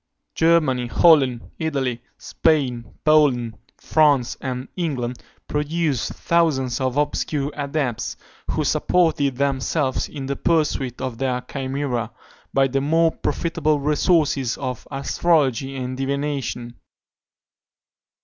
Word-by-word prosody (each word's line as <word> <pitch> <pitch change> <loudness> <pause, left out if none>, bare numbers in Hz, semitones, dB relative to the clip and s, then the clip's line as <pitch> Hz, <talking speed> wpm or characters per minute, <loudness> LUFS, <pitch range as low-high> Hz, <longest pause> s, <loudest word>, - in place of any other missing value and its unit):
Germany, 155 -7 +2
Holland, 135 -4 +4
Italy, 135 -7 -1 0.2
Spain, 130 -7 0
Poland, 135 -7 +3 0.2
France, 145 -6 +2
and 130 -1 -4
England 130 -9 -3 0.3
produced 150 -3 -1
thousands 140 -7 +1
of 130 +1 -1
obscure 145 0 -1
adepts, 140 -5 -2 0.3
who - - 0
supported 155 -7 +2
themselves, 140 0 0
in 140 -3 -6
the 140 +1 -2
pursuit 140 -6 0
of 130 -3 -4
their 125 -2 0
chimera, 135 -3 -3 0.4
by 135 0 +3
the 135 +1 -1
more 165 +3 +3
profitable 155 -3 -1
resources 145 -3 +1
of 130 -3 -5
astrology 135 -2 +1
and 130 -1 -4
divination. 135 -3 -3
140 Hz, 100 wpm, -22 LUFS, 130-155 Hz, 0.4 s, Holland